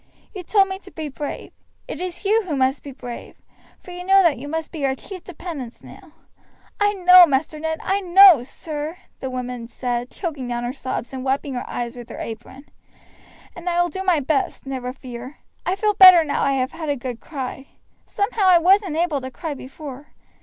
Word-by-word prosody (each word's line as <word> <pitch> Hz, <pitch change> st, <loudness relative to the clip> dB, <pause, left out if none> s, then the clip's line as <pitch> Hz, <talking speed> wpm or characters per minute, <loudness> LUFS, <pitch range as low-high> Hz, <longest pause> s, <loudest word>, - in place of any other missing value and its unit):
You 385 Hz, -, -6 dB
told 390 Hz, +2 st, +3 dB
me 380 Hz, 0 st, -5 dB
to 385 Hz, -, -14 dB
be 315 Hz, -5 st, -6 dB
brave; 285 Hz, +1 st, -6 dB, 0.3 s
it 310 Hz, -, -6 dB
is 365 Hz, +2 st, -6 dB
you 435 Hz, +3 st, +3 dB
who 310 Hz, -, -1 dB
must 265 Hz, +1 st, +1 dB
be 280 Hz, -, -9 dB
brave, 245 Hz, -2 st, -9 dB, 0.4 s
for 360 Hz, -, -13 dB
you 355 Hz, 0 st, -7 dB
know 385 Hz, +1 st, +5 dB
that 320 Hz, -8 st, +2 dB
you 285 Hz, -, -7 dB
must 320 Hz, +1 st, -4 dB
be 310 Hz, -4 st, -6 dB
our 265 Hz, -1 st, +1 dB
chief 370 Hz, +6 st, -10 dB
dependence 320 Hz, -9 st, -8 dB
now." -, -, -14 dB, 0.7 s
"I 410 Hz, 0 st, +3 dB
know, 365 Hz, -2 st, +8 dB
Master 300 Hz, +2 st, -1 dB
Ned; 320 Hz, 0 st, -3 dB
I 390 Hz, +1 st, +1 dB
know, 370 Hz, -5 st, +8 dB
sir," 300 Hz, +5 st, -6 dB, 0.2 s
the 265 Hz, -, -4 dB
woman 250 Hz, -2 st, -5 dB
said, 245 Hz, 0 st, -3 dB
choking 290 Hz, -9 st, -5 dB
down 240 Hz, 0 st, -3 dB
her 240 Hz, +1 st, -3 dB
sobs, 260 Hz, -2 st, -5 dB
and 260 Hz, -1 st, -5 dB
wiping 270 Hz, +1 st, -1 dB
her 245 Hz, -, -5 dB
eyes 240 Hz, 0 st, -4 dB
with 240 Hz, -1 st, -10 dB
her -, -, -8 dB
apron, 240 Hz, +5 st, -8 dB, 0.9 s
"and 345 Hz, +1 st, -4 dB
I 345 Hz, 0 st, 0 dB
will 350 Hz, 0 st, +2 dB
do 380 Hz, +4 st, -5 dB
my 360 Hz, -5 st, +3 dB
best, 280 Hz, 0 st, -1 dB
never 260 Hz, -2 st, -4 dB
fear. 255 Hz, +1 st, -9 dB, 0.3 s
I 365 Hz, -, +1 dB
feel 420 Hz, +1 st, +1 dB
better 370 Hz, -4 st, +9 dB
now 290 Hz, -, -2 dB
I 275 Hz, -, +2 dB
have 260 Hz, 0 st, -1 dB
had 325 Hz, -2 st, -6 dB
a 285 Hz, -, +1 dB
good 245 Hz, -2 st, -6 dB
cry. 270 Hz, -2 st, -6 dB, 0.4 s
Somehow 405 Hz, 0 st, -1 dB
I 365 Hz, -2 st, +7 dB
wasn't 370 Hz, -1 st, +3 dB
able 325 Hz, -5 st, 0 dB
to 260 Hz, -, -6 dB
cry 305 Hz, +4 st, -5 dB
before. 280 Hz, +1 st, -10 dB
295 Hz, 205 wpm, -22 LUFS, 260-360 Hz, 0.9 s, better